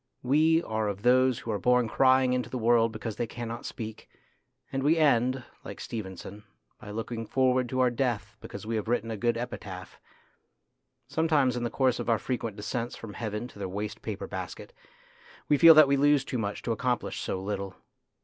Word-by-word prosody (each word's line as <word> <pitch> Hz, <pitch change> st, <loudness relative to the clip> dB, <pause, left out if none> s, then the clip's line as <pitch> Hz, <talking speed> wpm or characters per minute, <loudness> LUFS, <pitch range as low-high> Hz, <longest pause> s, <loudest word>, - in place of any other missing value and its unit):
We 160 Hz, +5 st, +3 dB
are 110 Hz, -1 st, -2 dB
of 100 Hz, 0 st, -4 dB
those 130 Hz, 0 st, +4 dB
who 115 Hz, -, -5 dB
are 105 Hz, -, -1 dB
born 125 Hz, -1 st, +3 dB
crying 130 Hz, +2 st, +4 dB
into 125 Hz, -1 st, -1 dB
the 130 Hz, -, -4 dB
world 115 Hz, -1 st, +3 dB
because 110 Hz, -1 st, -6 dB
they 120 Hz, -, -1 dB
cannot 120 Hz, 0 st, -6 dB
speak, 110 Hz, -2 st, -8 dB, 0.6 s
and 135 Hz, -, -2 dB
we 150 Hz, +4 st, +3 dB
end, 130 Hz, -4 st, +3 dB, 0.2 s
like -, -, -8 dB
Stevenson, 100 Hz, -1 st, -7 dB, 0.4 s
by 105 Hz, -, -11 dB
looking 115 Hz, +1 st, -5 dB
forward 130 Hz, -2 st, +2 dB
to 130 Hz, +1 st, 0 dB
our 125 Hz, -1 st, +3 dB
death 115 Hz, -5 st, -2 dB
because 100 Hz, -, -8 dB
we 115 Hz, 0 st, -1 dB
have 110 Hz, -, -4 dB
written 115 Hz, -1 st, 0 dB
a -, -, -2 dB
good 120 Hz, +2 st, 0 dB
epitaph. 95 Hz, -6 st, -7 dB, 1.1 s
Sometimes 150 Hz, -6 st, +2 dB
in 120 Hz, -, -2 dB
the 120 Hz, -, -1 dB
course 130 Hz, 0 st, +1 dB
of -, -, -3 dB
our 115 Hz, -, +4 dB
frequent 115 Hz, -4 st, -3 dB
descents 115 Hz, +3 st, -3 dB
from 110 Hz, -3 st, -9 dB
heaven 110 Hz, +2 st, -4 dB
to 100 Hz, -, -15 dB
the 95 Hz, -2 st, -4 dB
waste 105 Hz, +3 st, -5 dB
paper -, -, -5 dB
basket -, -, -7 dB, 0.7 s
we 150 Hz, -, +4 dB
feel 165 Hz, -1 st, +10 dB
that 155 Hz, -2 st, +8 dB
we 140 Hz, 0 st, +2 dB
lose 145 Hz, -1 st, +3 dB
too 125 Hz, -, -3 dB
much 100 Hz, -2 st, -3 dB
to 120 Hz, -, -2 dB
accomplish 125 Hz, +2 st, -1 dB
so 95 Hz, -, -3 dB
little. 100 Hz, -1 st, -4 dB
120 Hz, 195 wpm, -28 LUFS, 110-130 Hz, 1.1 s, feel